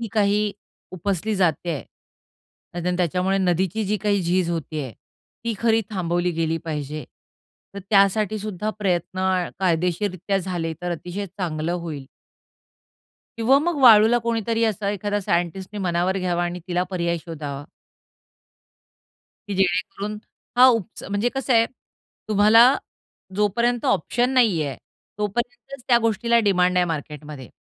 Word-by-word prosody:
ही 230 - -4
काही 210 -1 +2 0.4
उपसली 195 +3 -2
जात 180 -4 +4
आहे, 155 -9 -2 0.9
अन् 175 +1 -1
त्याच्यामुळे 185 +2 +1
नदीची 190 +3 0
जी 210 +2 0
काही 205 -2 +2
झीज 175 0 +1
होती 160 -2 -3
आहे, 130 - -7 0.5
ती 230 - -1
खरी 225 -1 +3
थांबवली 175 -2 0
गेली 165 0 0
पाहिजे. 150 -2 -4 0.7
तर - - -5
त्यासाठीसुद्धा 210 0 +2
प्रयत्न 185 -1 -1 0.3
कायदेशीररित्या 180 +2 0
झाले, 175 -3 -3
तर 175 - -2
अतिशय 180 +4 -5
चांगलं 170 -3 -3
होईल. 160 -6 -5 1.3
किंवा 255 +5 +4
मग 335 +2 -1
वाळूला 225 0 +7
कोणीतरी 230 0 0
असं 210 -2 -1
एखादा 205 +1 -1
सायंटिस्टनी 185 +3 -2
मनावर 180 +1 0
घ्यावा 175 -1 0
आणि 175 0 -4
तिला 180 0 +1
पर्याय 170 -2 -1
शोधावा 145 -4 -6 1.8
की 200 - -2
जेणेकरून 195 +3 -1 0.4
हा 255 - +8
उपच 225 -4 -1
म्हणजे 205 +4 0
कसं 270 -1 0
आहे 230 -1 +5 0.6
तुम्हाला 215 +2 +6 0.7
जोपर्यंत 235 +4 +1
ऑप्शन 245 +9 +1
नाही 215 -11 +4
आहे, 140 -2 -4 0.4
तोपर्यंतच 240 - -4
त्या 240 -2 +6
गोष्टीला 235 +1 +2
डिमांड 180 -2 +3
आहे 180 - +4
मार्केटमध्ये. 150 -3 -6
190 Hz, 125 wpm, -23 LUFS, 170-215 Hz, 1.8 s, हा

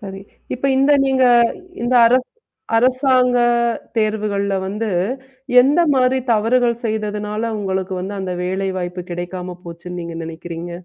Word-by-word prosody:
சரி. 195 -1 -8 0.3
இப்ப 260 +2 -2
இந்த 280 +2 +4
நீங்க 265 -1 +2 0.6
இந்த 240 +1 0
அரச 255 +2 +4 0.5
அரசாங்க 255 0 +3 0.6
தேர்வுகள்ல 210 -2 0
வந்து, 210 +3 -3 0.7
எந்த 285 +6 +3
மாரி 260 0 +2
தவறுகள் 235 +2 +1
செய்ததுனால 210 0 -2
உங்களுக்கு 190 -2 -2
வந்து 195 +3 -5
அந்த 185 -1 -3
வேலைவாய்ப்பு 185 -1 -3
கிடைக்காம 180 +1 -5
போச்சுன்னு 175 +1 -8
நீங்க 170 0 -7
நினைக்கிறீங்க? 165 +1 -7
210 Hz, 115 wpm, -19 LUFS, 185-245 Hz, 0.7 s, இந்த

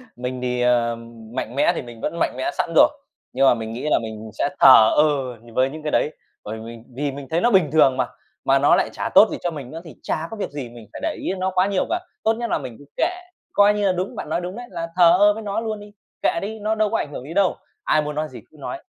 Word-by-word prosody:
Mình 125 +1 -5
thì, 125 -1 -1
ờ, 120 -1 +2 0.4
mạnh 125 -2 -4
mẽ 140 - +4
thì - - -2
mình 120 -2 -11
vẫn 170 - -3
mạnh - - 0
mẽ 130 - -1
sẵn 165 - -1
rồi, - - +8 0.5
nhưng 135 +2 +3
mà 135 - +7
mình 110 -1 -5
nghĩ 125 +6 -4
là - - +4
mình 110 -1 -7
sẽ - - +1
thờ 115 -5 +8
ơ 140 -5 +2
nh 115 0 -16
với 130 +3 +2
những 155 +2 -9
cái 150 - -2
đấy. - - +2 0.3
Bởi 110 +2 -6
mình 115 0 -9
vì 140 +1 -1
mình 140 0 -8
thấy 165 +2 +1
nó 240 - +3
bình 185 -6 +4
thường 140 -4 +4
mà, - - +1 0.4
mà - - +4
nó - - +5
lại - - +1
chả - - -3
tốt - - +8
gì - - -3
cho 175 - 0
mình 140 -6 -8
nữa 165 +1 -7
thì 160 - -11
chả 160 +1 -2
có 225 - -6
việc 210 - -3
gì 140 -4 -6
mình 115 -2 -13
phải - - -7
để - - -1
ý - - -2
đến 190 - -3
nó 190 +1 0
quá 185 +1 +3
nhiều 195 -2 0
cả. 350 - 0 0.2
Tốt 220 - +3
nhất 235 +1 -4
là - - +1
mình 130 -5 -7
cứ 145 - -14
kệ, 360 - +1 0.4
coi 205 0 +5
như 210 -1 0
là 190 - +4
đúng, 185 +1 -3
bạn - - -6
nói 170 - 0
đúng 180 +2 -5
đấy, 245 +1 -8
là 170 -2 -4
thờ 175 -1 +6
ơ 205 +1 +6
với 220 - -7
nó 205 0 -2
luôn 220 -2 -3
đi, 205 0 -12 0.3
kệ - - +1
đi, 215 +2 -5
nó 215 +1 0
đâu 215 -1 +1
có - - 0
ảnh 145 - -4
hưởng - - -6
gì 150 +5 -8
đâu. 195 -1 +2 0.3
Ai 155 - +3
muốn 150 0 -4
nói 155 +1 -1
gì 130 - -10
cứ - - -20
nói, - - -6
150 Hz, 300 wpm, -22 LUFS, 125-190 Hz, 0.5 s, rồi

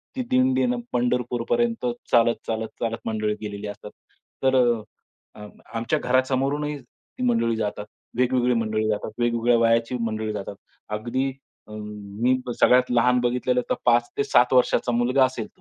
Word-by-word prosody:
ती 260 - -2
दिंडीनं 255 -1 +2
पंढरपूरपर्यंत 120 -1 0 0.3
चालत, 115 0 +4
चालत, 110 0 -2
चालत 115 -1 -2
मंडळी 110 -1 -1
गेलेली 105 -1 -5
असतात. 105 0 -9 0.5
तर 130 0 +3 0.8
अ, 105 - -10 0.3
आमच्या 115 0 -1
अ, - - -10
घरासमोरूनही 135 +3 +1
ती 125 0 -12
मंडळी 115 -1 +2
जातात. 105 -1 -3 0.3
वेगवेगळी 125 0 +2
मंडळी 110 -1 0
जातात, 105 +1 -2
वेगवेगळ्या 120 0 +2
वयाची 115 +1 +2
मंडळी 110 -1 -2
जातात. 100 -1 -6 0.4
अगदी 130 +5 -2 0.4
अ, - - -14
मी 105 +3 -2 0.2
सगळ्यात 125 0 +5
लहान 125 +1 +3
बघितलेलं 125 +1 +1
तर - - +2
5-7 120 +1 +3
वर्षांचा 125 -1 +3
मुलगा 125 +3 +3
असेल. 130 -4 -4
120 Hz, 135 wpm, -24 LUFS, 110-125 Hz, 0.8 s, सगळ्यात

